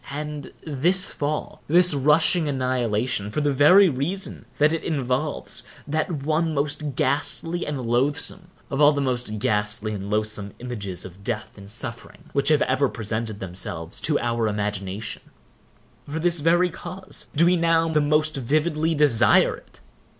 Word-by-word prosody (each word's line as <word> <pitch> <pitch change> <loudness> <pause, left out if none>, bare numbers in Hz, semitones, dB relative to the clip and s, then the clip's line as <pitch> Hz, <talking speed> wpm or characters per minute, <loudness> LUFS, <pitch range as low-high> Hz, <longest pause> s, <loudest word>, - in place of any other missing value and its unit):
And 150 0 -6
this 170 +6 +2
fall—this 155 +3 +1
rushing 150 +4 +3
annihilation—for 125 -4 -1
the 145 -1 +1
very 180 +9 +7
reason 165 +7 -3
that 150 +2 +4
it 165 - -2
involves 140 -1 -2 0.3
that 155 0 -2
one 160 +1 0
most 145 -1 -2
ghastly 150 +6 0
and 140 -4 -3
loathsome 145 +9 0 0.2
of 135 +1 -1
all 150 +1 +7
the 145 - -1
most 125 -5 -2
ghastly 105 +1 0
and 100 -1 -5
loathsome 105 -1 -1
images 100 -8 -5
of 95 +2 -12
death 110 0 -4
and 100 -1 -12
suffering 120 +8 -7
which 140 +1 +2
have 155 -2 +4
ever 130 +1 +1
presented 110 -1 -4
themselves 85 -3 -3
to 150 -1 +2
our 115 -1 0
imagination—for 105 +7 -6
this 170 0 +3
very 175 +3 +3
cause 185 +3 -7
do 165 +4 +4
we 180 +1 +4
now 165 -1 +2
the 155 -2 +2
most 155 +1 +1
vividly 155 +5 0
desire 130 -6 +4
it. - - -19
140 Hz, 145 wpm, -24 LUFS, 115-155 Hz, 0.3 s, very